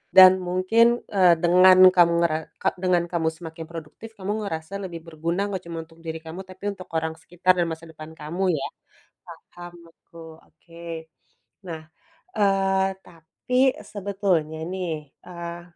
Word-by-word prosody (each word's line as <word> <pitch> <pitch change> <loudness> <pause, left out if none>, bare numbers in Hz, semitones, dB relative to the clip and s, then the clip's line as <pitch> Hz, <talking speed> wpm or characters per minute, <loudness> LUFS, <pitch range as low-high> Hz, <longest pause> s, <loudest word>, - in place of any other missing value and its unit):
dan 185 -1 +11 0.2
mungkin, 185 +6 +3 0.3
eee, 180 -3 +6
dengan 185 +2 +7 0.2
kamu 170 -1 +5
ngera 155 -2 +2 0.2
ka - - +3
dengan 180 -2 +3
kamu 160 -2 +1
semakin 165 -1 -8
produktif, 165 +7 -9
kamu 195 +2 -3
ngerasa 160 -1 -5
lebih 170 -3 -6
berguna, 165 +3 -2
nggak 185 -2 -4
cuma 165 -1 -5
untuk 165 0 -21
diri 160 0 -4
kamu, 165 +4 -7
tapi 185 +1 -14
untuk 185 -2 -11
orang 160 0 -2
sekitar 180 +2 +2
dan 170 - +2
masa 160 +1 -7
depan 155 0 -11
kamu, 175 +5 -1
ya. - - -3 0.9
Paham 175 0 -10 0.2
aku, 165 -1 -14
oke. 165 -1 -10 0.6
Nah, 160 -1 -6 0.5
eee, 195 -1 +2 0.2
tapi 165 +9 -8 0.3
sebetulnya 190 -6 -2
nih, 165 -6 -4 0.2
eee, 170 -1 -7
170 Hz, 145 wpm, -24 LUFS, 160-185 Hz, 0.9 s, dan